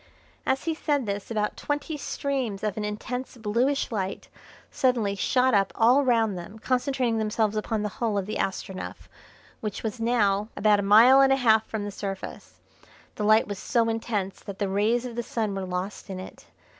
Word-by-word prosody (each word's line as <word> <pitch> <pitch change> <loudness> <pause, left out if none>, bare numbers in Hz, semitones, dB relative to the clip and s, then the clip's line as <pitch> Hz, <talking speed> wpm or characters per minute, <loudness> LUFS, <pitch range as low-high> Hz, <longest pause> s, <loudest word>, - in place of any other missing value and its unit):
As 265 0 +1
he 325 - 0
said 290 -4 0
this 200 -1 -4
about 210 -2 -1
twenty 290 +2 -3
streams 265 -8 -3
of 210 -3 -1
an 215 - -3
intense 245 +5 -4
bluish 240 +6 0
light 195 -3 -3 0.4
suddenly 235 -6 +1
shot 250 +6 +2
up 195 -2 +3
all 245 +5 +5
round 225 -5 +2
them, 180 +5 -8
concentrating 250 -1 0
themselves 215 0 0
upon 215 0 -1
the 210 - -1
hull 225 -4 0
of 195 - -1
the 215 - -4
Astronef, 190 0 -4 0.5
which 210 -2 -5
was 220 0 -3
now 215 -3 +1
about 210 -1 +4
a - - +1
mile 225 +7 +7
and 270 0 +5
a - - +6
half 220 -4 +4
from 220 -2 -3
the 205 - -4
surface. 195 -1 -7 0.5
The 210 - -4
light 215 +1 +5
was 205 -2 -5
so 230 -1 +1
intense 215 -4 -2
that 200 -1 -8
the 200 -1 -1
rays 220 +5 +1
of 240 -2 -6
the 240 - -1
Sun 220 -3 -2
were 195 -1 -3
lost 185 +3 -4
in 190 -1 -5
it. 185 - -11
220 Hz, 190 wpm, -26 LUFS, 205-245 Hz, 0.5 s, mile